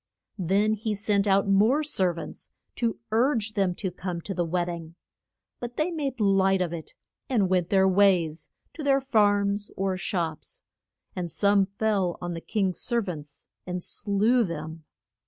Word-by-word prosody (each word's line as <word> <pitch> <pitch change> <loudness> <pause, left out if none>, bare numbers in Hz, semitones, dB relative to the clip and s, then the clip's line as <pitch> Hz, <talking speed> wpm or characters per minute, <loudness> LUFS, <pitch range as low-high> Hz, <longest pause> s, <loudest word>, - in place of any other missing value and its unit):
Then 200 +4 +2
he 215 0 -2
sent 205 0 +1
out 195 0 +3
more 215 +10 +4
ser 190 -12 +2
vants 165 - -9 0.3
to 230 -2 0
urge 225 -2 +2
them 195 -4 +1
to 190 -1 -3
come 180 -1 -5
to 195 - -5
the 175 -1 0
wed 175 +1 0
ding. 170 -1 -7 0.6
But 240 0 -7
they 315 +3 0
made 280 -6 -3
light 195 -2 +3
of 175 -2 -1
it, 160 -2 -8 0.3
and 210 -8 +2
went 180 -2 +1
their 190 -1 +4
ways, 185 -5 +2 0.2
to 320 - -8
their 275 -1 +3
farms 205 -5 +2
or 190 -1 0
shops; 170 -4 -4 0.5
and 180 -2 -3
some 200 +4 +3
fell 200 -3 -1
on 175 0 -4
the 165 - -6
king's 190 -2 -1
ser 235 -2 +1
vants 150 -6 -8 0.2
and 180 -1 -3
slew 220 +5 +1
them. 160 -3 -6
195 Hz, 165 wpm, -26 LUFS, 175-215 Hz, 0.6 s, more